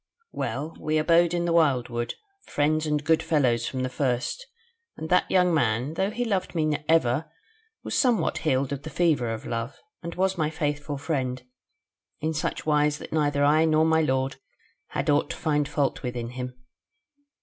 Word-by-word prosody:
"Well, 145 +8 -4
we 155 0 0
abode 165 +2 +4
in 175 0 0
the 170 - +1
wildwood, 125 -7 +1 0.3
friends 155 +2 +1
and 150 -1 0
good 160 +1 +3
fellows 125 -7 +1
from 130 -1 -3
the - - 0
first; 130 - -2 0.5
and 160 - -6
that 180 - +3
young 180 -2 +3
man, 125 -1 +1
though 190 +4 0
he 240 +3 -2
loved 190 -5 -1
me 155 -2 +1
ever, 155 -1 +2 0.5
was - - -3
somewhat 245 -5 +2
healed 135 -3 0
of 140 - -5
the 155 - -7
fever 155 -9 +1
of 110 - -5
love, 115 +2 -4 0.2
and 170 0 -6
was 190 0 0
my 155 -1 +1
faithful 150 -2 -3
friend, 130 -4 -2 0.8
in 160 +1 -1
such 155 - -3
wise 150 -1 +2
that - - -9
neither 145 -2 +1
I 155 +2 +4
nor 155 0 +3
my 160 0 +3
lord 130 -2 0 0.5
had - - -3
aught 145 -1 +2
to - - -5
find 150 -3 0
fault 140 -2 0
with 125 -2 -4
in 120 -1 -4
him. 125 0 -6
150 Hz, 180 wpm, -26 LUFS, 130-160 Hz, 0.8 s, abode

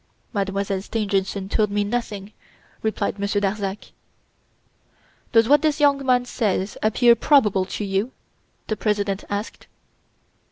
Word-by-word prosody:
"Mademoiselle 195 -1 -1
Stangerson 200 -2 -2
told 210 +1 +1
me 205 0 0
nothing," 210 -2 -4 0.5
replied 215 -2 -2
Monsieur 200 0 0
Darzac. 200 0 -3 1.4
"Does 225 -1 +5
what 290 +2 +5
this 310 -1 +1
young 285 -2 +3
man 250 -1 +2
says 205 -5 -1
appear 235 +2 +5
probable 215 -7 +3
to 205 +2 -4
you?" 195 +5 -1 0.5
the 215 - -2
President 205 -2 -1
asked. 205 +2 -5
210 Hz, 120 wpm, -23 LUFS, 200-235 Hz, 1.4 s, Does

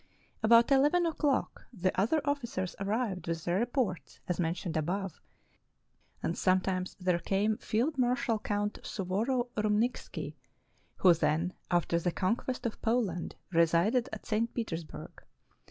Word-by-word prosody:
About 230 +3 +6
eleven 295 +6 +4
o'clock 295 -4 0
the 185 -5 0
other 230 +12 +2
officers 240 -10 -2
arrived 200 -2 -1
with 165 -1 -3
their 175 +2 +1
reports, 235 - -2
as 180 - -1
mentioned 170 0 -1
above, 180 +4 -2 1.0
and 170 - 0
sometimes 185 0 +1
there 180 -2 +1
came 200 +5 +1
Field 260 +7 0
Marshal 245 -2 +1
Count 205 0 -2
Suvorov 230 +6 -1
Rymnikski, 215 +3 -1 0.6
who 180 -2 +6
then, 165 +2 0 0.2
after 170 -1 +2
the 175 +1 0
conquest 240 +8 -1
of 230 - -3
Poland, 220 -7 0 0.2
resided 170 +10 +3
at - - -7
St. 225 +1 0
Peters 175 -8 -2
burg. - - -11
205 Hz, 130 wpm, -31 LUFS, 180-240 Hz, 1.0 s, About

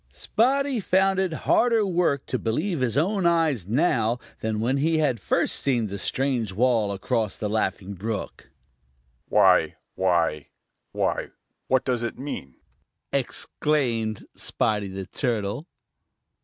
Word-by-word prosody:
Spotty 260 - +1
found 190 0 +2
it 190 -2 +1
harder 230 -3 +3
work 175 -7 +1
to 130 - -2
believe 155 - -1
his 125 -1 0
own 185 +3 +2
eyes 160 - +1
now 120 - +2 0.2
than 110 -1 -2
when 125 +5 +1
he 160 +3 +2
had 140 -7 +1
first - - +1
seen 125 -5 +1
the 100 -1 -5
strange 125 -3 0
wall 110 0 +2
across 100 +2 -1
the 105 - -3
Laughing 100 -2 -1
Brook. 105 +3 -5 0.8
"Why, - - +4 0.2
why, 85 -5 +1 0.4
why, - - -1 0.4
what 130 0 +2
does 125 -3 0
it 120 - -3
mean?" 130 - -6 0.6
exclaimed 125 -4 -1
Spotty 105 -2 0
the 95 0 -6
Turtle. 115 - -2
125 Hz, 130 wpm, -25 LUFS, 105-160 Hz, 0.8 s, Why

